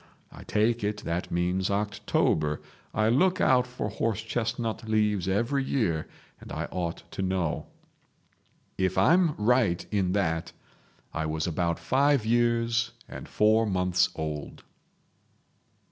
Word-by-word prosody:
I - - -11
take 115 +2 +1
it 105 0 -2
that 85 +2 -2
means 90 +2 0
October. 100 -7 0 0.3
I 110 0 +1
look 180 +10 +3
out 125 -1 +4
for 125 -3 -4
horse 110 +1 -2
chestnut 115 -1 -3
leaves 105 -4 +1
every 120 +8 +1
year, 90 - 0 0.3
and - - -12
I - - -3
ought 85 -2 -3
to - - -4
know. 95 -4 -1 1.1
"If 95 0 +1
I'm 165 - +4
right 105 -5 +2
in 95 -3 +1
that, 80 -5 -1 0.6
I 80 -1 -2
was 80 0 -2
about 85 0 0
five 140 -2 +2
years 120 0 +1
and - - -9
four 110 +1 +3
months 90 -1 +2
old." 75 -2 -5
105 Hz, 130 wpm, -27 LUFS, 90-115 Hz, 1.1 s, out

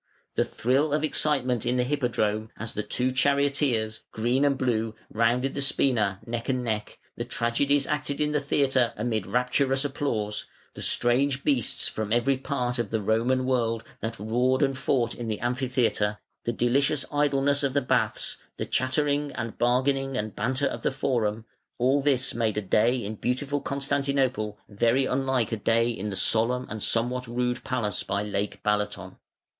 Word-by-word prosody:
The - - +2
thrill 140 +5 +1
of 150 0 +1
excitement 130 -6 +1
in 125 - 0
the 125 - +3
Hippodrome 115 -5 0
as 110 0 -5
the 105 - -2
two 125 +5 -1
charioteers, 140 -5 +1
Green 120 +5 +1
and 140 -2 +3
Blue, 115 -4 0 0.2
rounded 120 +4 +2
the 140 - -3
spina, 110 -8 +2
neck 115 +1 -4
and 130 -1 0
neck, 110 -3 -3 0.2
the 120 - -2
tragedies 125 +4 +1
acted 145 - -1
in 150 0 +1
the 150 - +2
theatre 135 -4 +1
amid 110 -3 -1
rapturous 135 +2 +1
applause, 115 -7 -2 0.3
the - - -9
strange 135 +3 +2
beasts 135 -6 +2
from 110 -1 -4
every 120 +4 +3
part 125 -2 -2
of 115 -4 -1
the 110 - 0
Roman 115 +5 +1
world 115 -3 0 0.2
that 115 +1 -4
roared 125 +6 +1
and 135 -1 +1
fought 125 -3 0
in 120 - -6
the 110 -2 -2
Amphitheatre, 120 -4 0 0.3
the 120 - +1
delicious 135 +5 +2
idleness 145 -1 +2
of 140 -2 0
the 140 - +3
Baths, - - 0 0.2
the - - -2
chatter 130 +4 +1
and 140 -6 -2
bargaining 135 +2 +1
and 110 -3 -3
banter 130 +3 0
of - - -2
the - - +1
Forum, 115 -5 -1 0.3
all 130 +4 +3
this 135 -2 +1
made 110 -2 0
a - - +1
day 110 +6 +3
in 110 +1 -5
beautiful 140 +5 -1
Constantinople 140 -6 0
very 115 +6 +2
unlike 130 -3 0
a 110 - -1
day 115 +3 +2
in 105 -2 -4
the 100 - -4
solemn 120 +5 +2
and 110 0 -5
somewhat 125 +3 0
rude 125 +1 -1
palace 115 -7 -1
by 100 +1 -1
Lake 105 -1 -3
Balaton. 105 -1 -1
125 Hz, 170 wpm, -26 LUFS, 115-135 Hz, 0.3 s, the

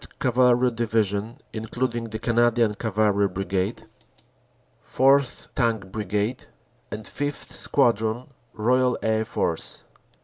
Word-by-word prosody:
Cavalry 125 0 +3
Division 110 -1 -1 0.2
(including 115 +2 -2
the 110 -1 -5
Canadian 120 -1 +2
Cavalry 105 -2 +1
Brigade); 95 +2 -2 1.0
4th. 135 0 +2
Tank 110 -6 0
Brigade; 105 +3 -2 0.4
and 110 +1 -6
5th. 145 0 -4
Squadron, 115 -2 +1 0.3
Royal 125 +3 +2
Air 110 0 +1
Force. 85 -6 -2
115 Hz, 95 wpm, -25 LUFS, 105-125 Hz, 1.0 s, Cavalry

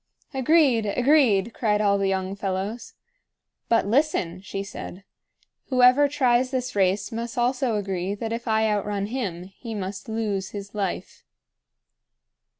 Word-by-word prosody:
"Agreed! 265 -4 +3
agreed!" 235 -3 +3
cried 210 -3 +1
all 200 -1 +2
the 195 - +1
young 190 0 -1
fellows. 200 +4 -4 0.7
"But, 230 -3 +3
listen!" 205 - 0
she 195 0 -5
said. 195 -1 -8 0.7
"Whoever 255 +2 +5
tries 255 -3 +2
this 255 -2 -3
race 195 +3 +1
must 230 +1 -5
also 250 -1 +1
agree 195 -1 -2
that 225 +2 -4
if 235 +1 -5
I 220 0 +2
outrun 205 -1 -1
him, 205 -7 -4
he 215 +5 -9
must 195 +1 -5
lose 210 -4 -2
his 200 -1 -8
life." 205 -2 -4
215 Hz, 135 wpm, -24 LUFS, 195-245 Hz, 0.7 s, Whoever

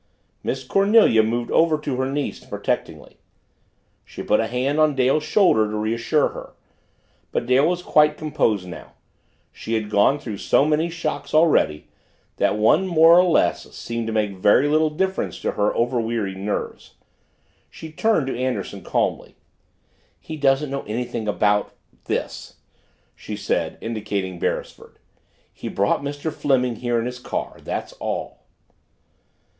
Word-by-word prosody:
Miss 130 +1 -3
Cornelia 195 - +4
moved 120 +2 -2
over 160 -1 +3
to 145 -4 -4
her 130 +1 -1
niece 145 0 -3
protectingly. - - -4 0.9
She - - -9
put - - +2
a 115 - 0
hand 130 +5 -1
on 155 -2 +3
Dale's 130 +3 +2
shoulder 150 - +3
to 105 - -3
reassure 115 +7 +1
her. - - -10 0.8
But - - -1
Dale 130 +4 +3
was 180 0 -1
quite 150 -2 +3
composed 110 -11 0
now 90 - -10 0.6
she 115 - -4
had 110 -1 -3
gone 105 +7 +4
through 115 -8 -7
so 140 - +3
many 155 +2 +1
shocks 165 -2 -4
already 155 - +3 0.5
that 105 - +1
one 150 - +3
more 170 0 +6
or - - +6
less 175 - +1
seemed 115 -1 -4
to - - -2
make 105 -2 0
very 105 +8 +3
little 155 +1 +2
difference 190 +5 -2
to - - -1
her 105 0 0
overwearied 115 -4 -1
nerves. 100 +2 -5 0.7
She 160 - -10
turned 190 -2 +1
to 135 - -3
Anderson 130 +1 -3
calmly. - - -2 0.8
"He 160 - -8
doesn't 140 -1 +1
know 140 - -2
anything 115 0 -4
about 105 0 +1 0.3
this," - - -4 0.6
she - - -7
said, - - -2
indicating 100 -5 -4
Beresford. - - -4 0.6
"He - - -8
brought 100 +6 0
Mr. 145 +2 -4
Fleming 125 -6 0
here 120 0 -1
in 115 - -2
his 125 0 -5
car - - -5
that's - - -5
all." - - -5
130 Hz, 145 wpm, -22 LUFS, 110-155 Hz, 0.9 s, more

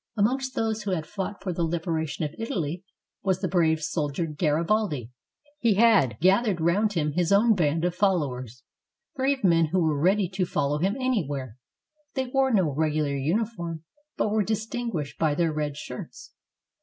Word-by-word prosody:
Amongst 260 +5 +1
those 220 -1 -1
who 210 - -4
had 160 -4 -2
fought 195 +2 -5
for 185 -2 -2
the 170 - -3
liberation 160 -2 -2
of 150 - -5
Italy 180 -6 -3 0.4
was 190 -2 0
the 190 - -1
brave 160 -3 +2
soldier 150 +1 -1
Garibaldi. 155 - 0 0.5
He 230 -6 +3
had 200 - +4
gathered 195 +2 +3
round 195 +6 +2
him 150 -4 0
his 175 +3 0
own 220 +3 +5
band 165 -3 +1
of 180 - 0
followers, 135 - -1 0.5
brave 270 -1 0
men 165 -3 +4
who 185 +4 0
were 155 -4 +1
ready 190 +3 +3
to 190 +1 -2
follow 145 -1 0
him 190 +6 +1
anywhere. 145 - -1 0.6
They 265 -1 0
wore 265 +1 +1
no 185 - +2
regu 155 +1 +1
lar 140 -1 -1
uniform, 170 +1 -2 0.3
but 210 - 0
were 215 0 +2
distinguished 220 - -3
by 155 -2 +2
their 165 -1 +1
red 150 -1 -2
shirts. 125 -4 -8
175 Hz, 170 wpm, -26 LUFS, 150-210 Hz, 0.6 s, own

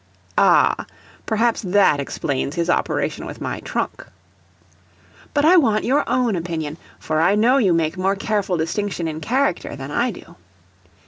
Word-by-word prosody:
[Ah - - +3 0.4
perhaps 225 +1 +1
that 190 -6 +3
explains 140 +1 -3
his 170 0 0
operation - - -1
with - - -8
my - - -4
trunk.] - - -4 1.3
But 290 0 +1
I 360 +3 +6
want 220 -9 +3
your 280 +3 +2
OWN 250 -4 +1
opinion, 165 -3 -4 0.2
for 155 0 -1
I 195 +5 +4
know 240 +6 +4
you 200 -8 +3
make 165 +1 0
more 190 +2 +1
careful 200 -2 -1
distinction 170 +1 -2
in 160 0 -5
character 255 - -1
than 135 +1 -7
I 240 +10 +1
do. 205 - -11
195 Hz, 150 wpm, -21 LUFS, 165-235 Hz, 1.3 s, I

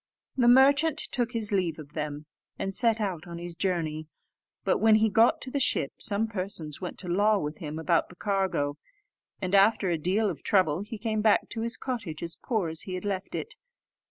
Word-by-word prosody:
The 245 -3 +3
merchant 280 +5 +5
took 245 -5 -2
his 220 -3 -2
leave 180 -5 0
of 150 -2 -11
them, 150 -1 -4 0.3
and 195 - -3
set 230 +1 +1
out 185 -6 -3
on 170 0 -7
his 175 0 -7
journey; 160 -4 -2 0.6
but - - +1
when 220 -1 +5
he 220 0 +3
got 225 +3 +4
to 260 - -6
the 280 - -1
ship, 140 - +2
some 205 +2 +1
persons 185 -7 -5
went 180 - -5
to 185 - -5
law 205 +4 +3
with 150 -4 -4
him 155 -1 -5
about 165 +1 +1
the 180 - -13
cargo, 190 -7 -1 0.6
and 185 +1 -2
after 200 -1 +4
a 165 - 0
deal 195 +7 +1
of - - -4
trouble 185 -4 +2
he 210 +2 -7
came 215 -1 -1
back 215 -1 +3
to 225 - -4
his 230 +1 +1
cottage 210 - -5
as 165 -1 -3
poor 220 -9 -2
as 160 0 -2
he 185 - -4
had 185 - -6
left 195 -2 -3
it. - - -4
195 Hz, 210 wpm, -28 LUFS, 165-220 Hz, 0.6 s, merchant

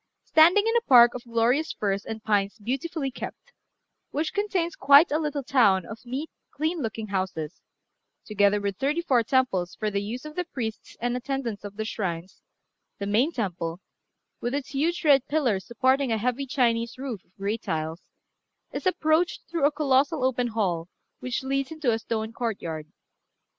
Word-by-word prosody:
Standing 345 +7 +6
in 455 +1 +1
a - - +2
park 240 -2 +8
of 250 -1 -7
glorious 235 +6 +1
firs 200 -1 -2
and 220 -1 -6
pines 205 -1 +1
beautifully 270 +6 -3
kept, - - -8 0.6
which 310 +2 -2
contains 380 -5 -1
quite 280 +4 +6
a 305 - +2
little 295 -3 -2
town 205 -9 +3
of 220 +1 -8
neat, 275 +6 -4 0.2
clean 320 +4 -2
looking 225 -4 -4
houses, 185 -5 -3 0.6
together 205 -1 +3
with 200 -1 -3
thirty 295 +7 0
four 255 -8 +3
temples 225 -7 +1
for 215 -1 -2
the 200 0 0
use 235 +7 -5
of 305 0 -8
the 360 - 0
priests 235 -10 -6
and 245 +1 -1
attendants 250 -5 -3
of 205 -1 -8
the 220 - -2
shrines, 185 -5 -4 0.6
the 200 - -4
main 225 +10 +2
temple, 175 - -3 0.6
with 240 +3 -2
its 285 -2 -3
huge 325 +5 -1
red 275 -3 +5
pillars 245 -11 0
supporting 260 +2 +2
a 225 - +2
heavy 250 +5 -1
Chinese 235 -3 +1
roof 255 -7 -5
of 180 - -38
grey 200 +3 -1
tiles, 160 -3 -3 0.7
is - - -3
approached 325 -1 +1
through 330 -4 +1
a - - 0
colossal 285 0 +2
open 250 -1 +1
hall 185 -7 -1 0.3
which 250 +1 -3
leads 275 0 -1
into 310 -6 0
a 225 - 0
stone 220 0 -3
courtyard. 170 -11 -4
245 Hz, 170 wpm, -26 LUFS, 205-285 Hz, 0.7 s, park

